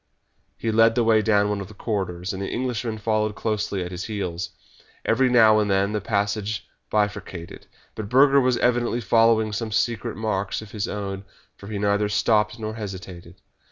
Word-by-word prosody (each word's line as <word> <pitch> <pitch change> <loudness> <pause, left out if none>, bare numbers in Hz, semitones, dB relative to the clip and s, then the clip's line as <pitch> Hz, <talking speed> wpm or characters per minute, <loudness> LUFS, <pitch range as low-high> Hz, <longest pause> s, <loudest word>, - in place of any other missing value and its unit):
He 115 - -1
led 115 +1 +4
the 120 - +3
way 110 -1 +4
down 105 -2 +3
one 105 -1 -2
of 95 - -7
the 105 - -14
corridors, 95 -4 -3
and 95 - -5
the 100 - -3
Englishman 120 -3 -2
followed 110 0 0
closely 100 -4 -2
at 90 - -6
his 90 0 -5
heels. 95 -5 -4 0.6
Every 130 +3 +3
now 110 -3 +6
and 105 -1 0
then 100 +1 +2
the 105 -1 -2
passage 105 0 -1 0.2
bifurcated, 105 -5 -3 0.3
but 105 -2 -6
Burger 140 +2 +5
was 125 -1 +2
evidently 120 -1 +1
following 115 0 +3
some 110 +1 -3
secret 115 -1 -1
marks 105 -3 -2
of 110 -2 -10
his 105 -2 -3
own, 100 -2 -4 0.3
for 100 - -12
he 105 -1 -4
neither 105 +1 +1
stopped 105 +1 +2
nor 110 -1 -4
hesitated. 95 -5 -8
105 Hz, 180 wpm, -24 LUFS, 100-115 Hz, 0.6 s, now